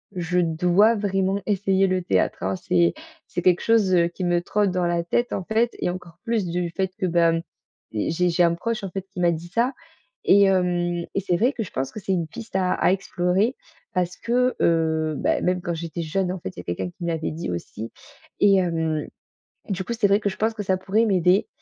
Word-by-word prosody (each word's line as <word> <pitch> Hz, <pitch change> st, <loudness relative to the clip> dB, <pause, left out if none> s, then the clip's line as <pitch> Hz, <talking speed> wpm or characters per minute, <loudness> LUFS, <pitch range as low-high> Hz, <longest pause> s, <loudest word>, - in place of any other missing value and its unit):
je 180 Hz, 0 st, 0 dB
dois 180 Hz, +6 st, +3 dB
vraiment 195 Hz, -1 st, 0 dB
essayer 195 Hz, -1 st, +2 dB
le 185 Hz, 0 st, 0 dB
théâtre, 95 Hz, -, +1 dB
hein. 95 Hz, 0 st, 0 dB
C'est 85 Hz, -2 st, +2 dB, 0.3 s
c'est -, -, -3 dB
quelque 180 Hz, -1 st, +3 dB
chose, 220 Hz, -5 st, +3 dB
heu, 170 Hz, -1 st, +4 dB
qui 180 Hz, +2 st, -6 dB
me 175 Hz, 0 st, +2 dB
trotte 205 Hz, +2 st, +1 dB
dans 180 Hz, -1 st, 0 dB
la 170 Hz, 0 st, 0 dB
tête 240 Hz, +8 st, 0 dB
en 190 Hz, -, -2 dB
fait 225 Hz, +4 st, +1 dB
et -, -, 0 dB
encore 175 Hz, -1 st, -7 dB
plus 230 Hz, -5 st, 0 dB
du 175 Hz, 0 st, -2 dB
fait 190 Hz, +2 st, -2 dB
que -, -, -1 dB
ben, 170 Hz, -1 st, +3 dB, 0.6 s
mmh, 105 Hz, -, -1 dB
j'ai 180 Hz, +2 st, +1 dB
j'ai 175 Hz, +1 st, +3 dB
un 170 Hz, -1 st, +4 dB
proche, 225 Hz, +4 st, -3 dB
en 195 Hz, -, -3 dB
fait, 190 Hz, +1 st, -5 dB
qui 180 Hz, -, -8 dB
m'a 175 Hz, -1 st, +3 dB
dit 165 Hz, +1 st, -5 dB
ça 235 Hz, +9 st, 0 dB, 0.5 s
et 200 Hz, +1 st, +6 dB
hem 175 Hz, -2 st, +1 dB
et -, -, +1 dB
c'est 180 Hz, -2 st, 0 dB
vrai 245 Hz, +7 st, +3 dB
que 230 Hz, -, -3 dB
je 195 Hz, -, -10 dB
pense 135 Hz, 0 st, -3 dB
que 215 Hz, -, -7 dB
c'est 190 Hz, 0 st, -1 dB
une 170 Hz, -3 st, -1 dB
piste 230 Hz, -3 st, -10 dB
à 185 Hz, -1 st, +2 dB
à -, -, +2 dB
explorer 190 Hz, +5 st, 0 dB, 0.4 s
parce 180 Hz, -1 st, -1 dB
que, 250 Hz, +2 st, +1 dB
heu, 160 Hz, -2 st, +2 dB
bah -, -, +1 dB
même 180 Hz, 0 st, 0 dB
quand 170 Hz, -, -2 dB
j'étais 170 Hz, +1 st, -5 dB
jeune, 180 Hz, +3 st, -1 dB
en 185 Hz, -, -4 dB
fait, 130 Hz, -, -5 dB
il -, -, -9 dB
y -, -, -4 dB
a -, -, -16 dB
quelqu'un 90 Hz, +1 st, -3 dB
qui 130 Hz, -, -11 dB
me 170 Hz, -, -1 dB
l'avait 160 Hz, -1 st, -2 dB
dit 160 Hz, -, -5 dB
aussi 105 Hz, +6 st, -6 dB, 0.5 s
et 200 Hz, -1 st, +6 dB
hem, 160 Hz, -4 st, 0 dB, 0.6 s
du 190 Hz, -1 st, -2 dB
coup 235 Hz, -, -2 dB
c'était 225 Hz, -3 st, +2 dB
vrai 200 Hz, +1 st, +4 dB
que 210 Hz, -, -2 dB
je 190 Hz, -, -6 dB
pense 220 Hz, +1 st, +1 dB
que 215 Hz, -2 st, -5 dB
ça 190 Hz, -1 st, +1 dB
pourrait 200 Hz, +4 st, +1 dB
m'aider 185 Hz, -2 st, +3 dB
180 Hz, 235 wpm, -24 LUFS, 170-200 Hz, 0.6 s, et